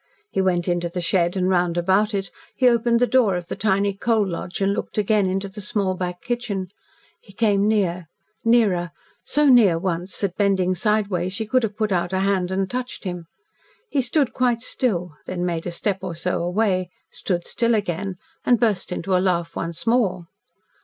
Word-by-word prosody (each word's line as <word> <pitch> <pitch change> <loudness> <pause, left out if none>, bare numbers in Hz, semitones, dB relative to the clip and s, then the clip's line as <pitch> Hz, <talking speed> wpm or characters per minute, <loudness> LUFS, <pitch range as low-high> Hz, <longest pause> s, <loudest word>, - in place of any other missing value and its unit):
He 195 - +1
went 180 -2 +1
into 175 -1 0
the 180 - -4
shed 175 +1 +1
and 185 -1 +1
round 175 -2 +1
about 195 +5 +2
it, 195 -1 -3 0.2
he 255 - +3
opened 235 -1 +3
the 245 - +4
door 245 -7 +3
of 175 -1 -5
the - - -3
tiny 200 -1 +1
coal 215 +1 +1
lodge, 175 0 -5
and 195 0 +2
looked - - -5
again 210 -1 +2
into 190 +1 -1
the 195 +2 -9
small 200 -2 0
back 180 -1 -4
kitchen. 225 -6 -3 0.5
He 195 - -18
came 205 -1 +2
near 180 -5 0 0.4
nearer 200 -7 +2 0.3
so 300 0 +2
near 225 -10 +6
once 175 +1 -3
that, 195 -3 -1
bending 190 -3 +2
sidewise, 190 -2 0
she 220 +2 -3
could 255 +4 +2
have 215 -2 -3
put 215 -2 0
out 175 0 0
a 190 - +1
hand 190 -2 +1
and 190 0 0
touched 250 +3 -5
him. 175 -3 -5 0.6
He 280 - +2
stood 260 +1 0
quite 245 -2 +1
still, 180 - -2
then 180 -1 -2
made 170 -2 -2
a - - -3
step 190 +3 -2
or 185 -3 -5
so 170 - -1
away, 185 0 0 0.2
stood 175 -3 -2
still 235 -1 +1
again, 195 -1 -2 0.3
and 245 -2 +3
burst 210 -7 0
into 185 +1 -1
a 180 - +3
laugh 170 -3 0
once 165 0 -4
more. 225 -7 +1
195 Hz, 195 wpm, -22 LUFS, 180-220 Hz, 0.6 s, near